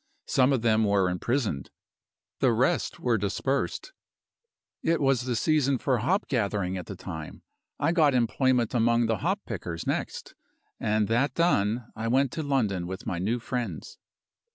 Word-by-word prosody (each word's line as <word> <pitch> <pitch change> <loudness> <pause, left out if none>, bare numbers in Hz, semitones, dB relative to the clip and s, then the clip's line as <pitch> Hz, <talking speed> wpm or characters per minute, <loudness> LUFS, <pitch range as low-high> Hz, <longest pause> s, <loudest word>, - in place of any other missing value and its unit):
Some 130 +1 +3
of 130 -4 +1
them 110 -1 +3
were 100 -3 +2
imprisoned; 100 - -1 0.7
the - - +4
rest - - +1
were 120 -3 +1
dispersed. 135 - -2 0.9
It 165 0 +1
was 135 -3 +2
the 125 -2 -1
season 140 +1 +2
for 130 -1 0
hop 185 - 0
gathering 100 -6 -1
at 90 - -6
the 100 - -6
time. 80 -4 -8 0.4
I - - +2
got 155 -6 +4
employment 125 0 +2
among 120 0 +3
the 110 -1 0
hop 190 +5 -1
pickers 85 -6 -5
next; - - -3 0.5
and 105 0 +1
that 120 +5 +1
done, 115 - +1
I 110 +1 -3
went 130 +2 +2
to 160 - -3
London 110 - 0
with 95 +1 -6
my 85 - -2
new 110 +7 0
friends. 120 +1 -5
115 Hz, 155 wpm, -27 LUFS, 100-135 Hz, 0.9 s, the